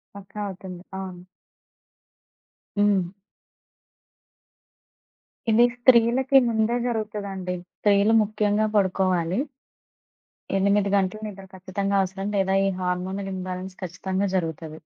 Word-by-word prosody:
పక్కా! 200 +1 -8
అవుతుంది. 185 -1 -8 0.2
అవును. 185 -2 -7 1.6
హ్మ్. 200 -4 +3 2.4
ఇది 235 +2 +6
స్త్రీలకి 245 +2 +5
ముందే 225 +2 +1
జరుగుతదండి. 200 -5 -3 0.2
స్త్రీలు 205 +1 +4
ముఖ్యంగా 210 0 +1
పడుకోవాలి. 185 -1 +1 1.2
8 200 +1 +2
గంటలు 195 +2 0
నిద్ర 195 -2 -9
ఖచ్చితంగా 195 +2 -2
అవసరం. 195 +2 -3
లేదా 190 -1 +2
ఈ - - +2
హార్మోనల్ 185 +2 -2
ఇంబాలెన్స్ 185 0 -5
ఖచ్చితంగా 190 +3 -2
జరుగుతది. 160 -2 -4
195 Hz, 90 wpm, -25 LUFS, 185-210 Hz, 2.4 s, ఇది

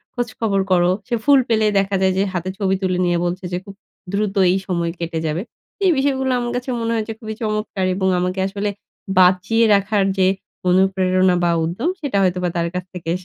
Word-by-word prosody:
খোঁজখবর 225 -5 -1
করো। 175 -1 +4 0.2
সে 240 - 0
ফুল 285 -1 +6
পেলেই 220 -2 +3
দেখা 195 0 0
যায় 190 0 +3
যে, 195 - +3
হাতে 180 0 -2
ছবি 195 -2 +1
তুলে 185 -1 0
নিয়ে 175 -1 +1
বলছে 180 +2 -3
যে, - - +1
খুব 200 - -10 0.4
দ্রুত 205 0 -1 0.2
এই 190 - +2
সময় 170 -3 -1
কেটে 165 -1 -3
যাবে। 155 +2 -1 0.4
এই 370 - +5
বিষয়গুলো 265 -1 +1
আমার 240 0 -3
কাছে 250 +1 -4
মনে 230 - -1
হয়েছে 225 0 -2
খুবই 220 -1 -6
চমৎকার 215 -3 -2
এবং 190 0 0
আমাকে 180 +1 -2
আসলে 200 +1 -3 0.5
বাঁচিয়ে 185 +5 +4
রাখার 200 0 +1
যে, 185 - +4 0.4
অনুপ্রেরণা, 185 0 +3
বা 170 - +3
উদ্যম 185 - -1
সেটা 280 -9 -1
হয়তোবা 180 -1 0
তার 170 0 0
কাছ 180 0 -3
থেকে 170 -3 -6
190 Hz, 190 wpm, -20 LUFS, 180-220 Hz, 0.5 s, ফুল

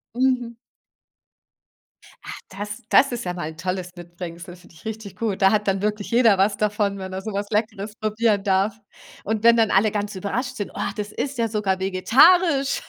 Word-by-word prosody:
Mhm. 250 -2 0 1.7
Ach, - - -7 0.2
das 205 +2 -7
das 275 - +5
ist 240 -3 -4
ja 180 - -2
mal 175 -3 -5
'n 160 - -16
tolles 185 +1 -4
Mitbringsel, 175 0 -9
finde 175 -1 -19
ich 155 - -18
richtig 220 -3 -6
gut, 210 -2 -3
da 195 0 +6
hat 210 -1 0
dann 195 0 +1
wirklich 210 +1 -2
jeder 230 -4 +5
was 200 +1 +2
davon, 205 -1 0
wenn 190 -1 -7
er 190 - -4
so 215 +1 -6
was 200 +1 -3
Leckeres 210 -1 -2
probieren 215 -2 0
darf, 195 +1 +1 0.5
und 220 +1 -2
wenn 235 0 +6
dann 220 -2 +3
alle 205 +3 +3
ganz 205 -1 -3
überrascht 245 +7 -3
sind: 205 -5 -5
„Oh, - - -2
das 210 -1 -5
ist 280 +2 -4
ja 230 - +1
sogar 205 -4 -1
vegetarisch.“ 275 - +4
205 Hz, 190 wpm, -23 LUFS, 190-225 Hz, 1.7 s, da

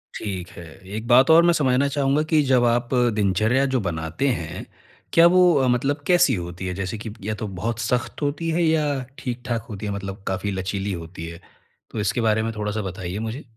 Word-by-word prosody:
ठीक 95 -4 -5
है। 85 - -9 0.3
एक 110 +2 -5
बात 130 +2 +6
और 165 +1 +7
मैं 175 0 +4
समझना 135 -3 +2
चाहूँगा 140 +1 +1
कि 155 -1 +5
जब 125 -2 +4
आप 120 0 +1 0.3
दिनचर्या 110 +6 +2
जो - - +3
बनाते 80 - -2
हैं, 85 - -3 0.5
क्या 165 - +7
वो 180 0 +5
अ, 135 -2 +3
मतलब 135 +4 +1
कैसी 175 -6 +4
होती 90 0 -6
है? 90 - -2
जैसे 95 +4 -4
कि 110 +1 -7
या 110 +2 -2
तो 110 - -5
बहुत 115 0 -2
सख्त 120 +4 -2
होती 145 +3 -1
है 170 +2 +1
या 160 -2 +2 0.3
ठीक-ठाक 120 -2 -4
होती 105 -1 -6
है, 105 - -2
मतलब 100 0 -6
काफ़ी 95 +2 -2
लचीली 95 +1 -3
होती 85 -1 -7
है, 85 +1 -9 0.5
तो 110 - -4
इसके 110 +3 0
बारे 110 -1 +2
में 115 - -2
थोड़ा-सा 105 0 -2
बताइए 95 0 -5
मुझे। 115 +6 -5
110 Hz, 205 wpm, -23 LUFS, 95-135 Hz, 0.5 s, और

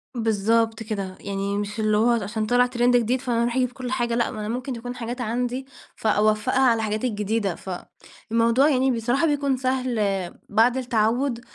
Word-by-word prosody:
بالضبط 225 0 +1
كده، 195 -4 -4
يعني 200 0 -3
مش 205 +2 -4
اللي 215 -1 +2
هو 225 +3 +3
عشان 220 -1 0
طلع 245 +3 +4
ترند 245 0 +2
جديد 245 +2 0
فأنا 240 -3 0
أروح 235 0 -1
أجيب 255 -1 +1
كل 255 -1 -6
حاجة، 240 -3 0
لأ، 235 - +1
ما 215 - -7
أنا 210 - -4
ممكن 250 +3 -3
تكون 245 +1 -6
حاجات 240 +1 -5
عندي 245 +3 -2 0.3
فأوفّقها 215 +2 +1
على 245 -3 +4
الحاجات 215 0 -2
الجديدة، 210 -4 -1
فالموضوع 230 +7 -1
يعني 265 -2 +2
بصراحة، 245 +5 +1
بيكون 280 -3 +1
سهل 255 -2 -1 0.5
بعد 230 +4 +3
التعوّد 240 +1 0
235 Hz, 170 wpm, -24 LUFS, 215-250 Hz, 0.5 s, طلع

